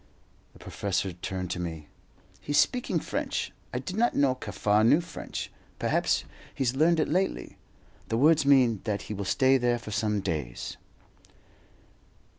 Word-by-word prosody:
The - - -16
professor 95 -1 -2
turned 90 +1 -5
to - - -3
me. 80 -3 -5 0.5
"He's 145 - -1
speaking 250 -1 +2
French. - - -3 0.2
I - - -3
did 185 - -5
not 240 +2 +2
know 140 -2 +3
Kaffar 105 -4 0
knew 120 +8 +5
French; 170 0 -6 0.3
perhaps - - +1 0.3
he's 130 -1 0
learned 160 +3 +3
it - - +2
lately. 185 +5 -1 0.5
The 115 - 0
words 155 +4 +5
mean 130 -7 +4
that 105 -3 -2
he - - -6
will 100 -1 -4
stay 130 +6 +3
there 120 -1 +2
for 115 -2 -9
some 105 0 0
days." 75 -10 -4
120 Hz, 150 wpm, -28 LUFS, 100-145 Hz, 0.5 s, knew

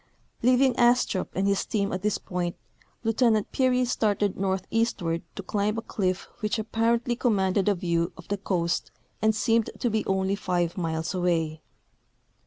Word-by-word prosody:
Leaving 255 +2 +4
Astrup 240 -5 +3
and 195 +1 +1
his 200 -1 +2
team 200 -3 -1
at 185 - -2
this 210 0 +1
point. 175 -1 -3 0.5
Lieutenant 225 -2 +2
Peary 255 -1 +2
started 205 -4 +1
northeastward 190 -2 -1
to 200 - -6
climb 210 +3 -1
a 225 - -3
cliff 185 -4 -2
which 210 +2 -1
apparently 230 +2 +1
com 235 -2 +1
manded 190 +1 +1
a 205 - +4
view 170 -1 0
of 175 - -12
the 205 - -1
coast 180 -3 -1 0.3
and 220 0 +3
seemed 225 0 +2
to 240 - 0
be 220 0 +1
only 190 0 +1
five 180 -4 -1
miles 165 -1 -2
away. 165 -4 0
200 Hz, 160 wpm, -26 LUFS, 180-225 Hz, 0.5 s, Leaving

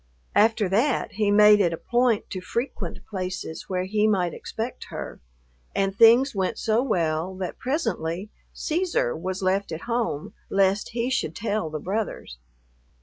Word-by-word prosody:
After 220 -1 +4
that 230 +9 +1
he 210 0 0
made 210 0 +7
it 170 -3 +2
a - - -3
point 240 0 +1
to 185 - -4
frequent 235 +8 -4
places 185 -5 -5
where 185 -1 0
he 210 +3 +1
might 180 -5 +1
expect 225 +3 -5
her, - - -7 0.6
and 195 0 0
things 235 +6 +6
went 195 +2 -1
so 220 +1 +1
well 175 -6 0
that 185 -1 -5
presently 210 - -2 0.2
Cæsar 375 +10 -1
was 190 - -4
left 190 0 +1
at 160 - -5
home 230 -11 -2 0.2
lest 195 +1 +2
he 240 +2 -1
should 165 - -1
tell 210 -6 -1
the 155 - -4
brothers. 190 - -4
205 Hz, 150 wpm, -25 LUFS, 185-230 Hz, 0.6 s, made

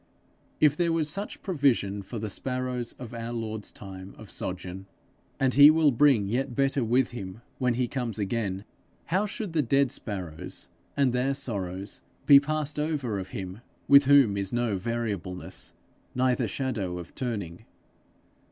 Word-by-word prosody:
If 150 -1 +5
there 170 +1 +1
was 165 -2 +1
such 200 +5 -5
provision 130 - +1
for 115 +5 -7
the 110 0 -3
sparrows 125 0 -3
of 120 -2 -10
our 115 0 -5
Lord's 110 -2 -4
time 95 -1 -9
of 110 - -9
sojourn, 95 +1 -5 0.5
and 130 -1 +2
he 145 +1 +10
will 155 -2 +5
bring 125 -5 +4
yet 120 +3 -1
better 135 -1 +2
with 120 +2 +2
him 105 -1 -7 0.2
when 125 -2 +1
he 125 0 0
comes 120 -4 -3
again, 100 -2 -2 0.4
how 190 +5 +1
should 205 -3 -5
the 160 - +3
dead 135 0 +2
sparrows 90 -7 -5 0.3
and 135 -3 +3
their 130 +2 +1
sorrows 100 -7 -5 0.2
be 140 -1 +9
passed 150 0 -2
over 140 -9 -1
of 95 0 -6
him 95 +2 -6 0.3
with 140 0 +8
whom 135 -7 +5
is 100 -1 -2
no 120 -3 0
variableness, 100 -3 -3 0.4
neither 125 -1 +2
shadow 105 -6 -3
of 85 -2 -9
turning? 100 -9 -4
120 Hz, 155 wpm, -27 LUFS, 100-140 Hz, 0.5 s, he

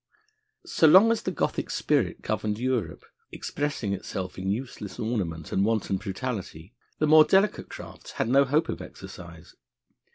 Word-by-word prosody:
So 160 - +3
long 190 +8 +8
as 230 - 0
the - - -2
Gothic 175 - -2
spirit - - 0
governed 105 -1 -2
Europe, 120 -9 -2 0.3
expressing 145 -9 -3
itself 95 -1 -5
in 95 +1 -3
useless 105 -2 -4
ornament 90 -9 -3
and 95 - +2
wanton 110 -3 0
brutality, 100 -3 -5 0.2
the 155 - +1
more 155 0 +8
delicate 195 +5 +2
crafts - - -10
had - - -1
no 135 +3 +5
hope 150 +4 +1
of - - -4
exercise. 85 -1 -11
110 Hz, 150 wpm, -26 LUFS, 95-145 Hz, 0.3 s, long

